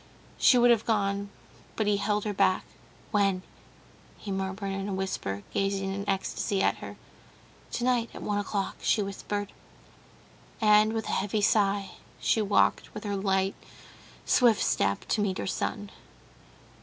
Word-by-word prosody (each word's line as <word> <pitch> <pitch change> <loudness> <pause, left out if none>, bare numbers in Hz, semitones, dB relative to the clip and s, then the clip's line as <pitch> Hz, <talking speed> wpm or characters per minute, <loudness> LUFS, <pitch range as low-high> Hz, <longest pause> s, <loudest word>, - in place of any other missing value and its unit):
She 250 - +6
would 245 0 +6
have 230 -2 +3
gone, 200 -2 0 0.5
but 220 - 0
he 205 0 +2
held 205 +1 0
her 210 - -1
back. 195 -1 +2 0.5
"When?" 195 -3 +2 0.7
he 205 - -7
murmured 195 +1 -3
in 195 +1 -3
a - - -2
whisper, 100 - -3
gazing 195 -1 0
in 200 +1 -4
ecstasy 195 0 -1
at - - +2
her. - - -8 0.8
"Tonight, 245 -1 +1
at - - -7
one 205 0 0
o'clock," 200 -1 -2
she 210 - +2
whispered, 200 +1 -4 1.1
and, 215 0 +5
with 225 -1 -2
a - - -3
heavy 205 +2 0
sigh, 200 -2 +2 0.3
she 220 - +2
walked 205 -1 +2
with 210 - -6
her 205 -1 -2
light, 195 0 +1 0.7
swift 230 -5 +4
step 100 0 +1
to 215 - +1
meet 195 -2 0
her - - -3
son. 205 +1 -3
200 Hz, 150 wpm, -28 LUFS, 195-210 Hz, 1.1 s, She